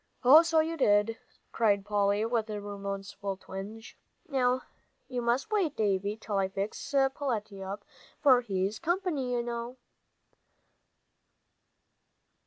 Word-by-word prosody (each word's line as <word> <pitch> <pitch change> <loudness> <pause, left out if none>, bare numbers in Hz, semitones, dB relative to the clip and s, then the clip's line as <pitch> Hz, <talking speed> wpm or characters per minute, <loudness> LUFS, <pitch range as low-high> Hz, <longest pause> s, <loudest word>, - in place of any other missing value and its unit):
"Oh, 280 +6 +9
so 330 -1 +3
you 325 +1 -3
did," 210 -3 +3 0.3
cried 200 -3 +2
Polly, 205 0 +1
with 230 -1 -1
a 210 -1 -3
remorseful 200 -1 -5
twinge. 200 +4 -8 0.3
"Now 255 -2 +1 0.4
you 250 -2 -3
must 240 - 0
wait, 375 -9 +1
Davie, 205 0 0
till 210 -2 -2
I 190 - +1
fix 200 +7 -4
Peletiah 240 -8 -1
up, 205 0 -10 0.3
for 265 -4 +6
he's 195 -1 -2
company, 340 -7 -1
you 240 -1 0
know." 235 +1 -5
225 Hz, 120 wpm, -30 LUFS, 200-265 Hz, 0.4 s, Oh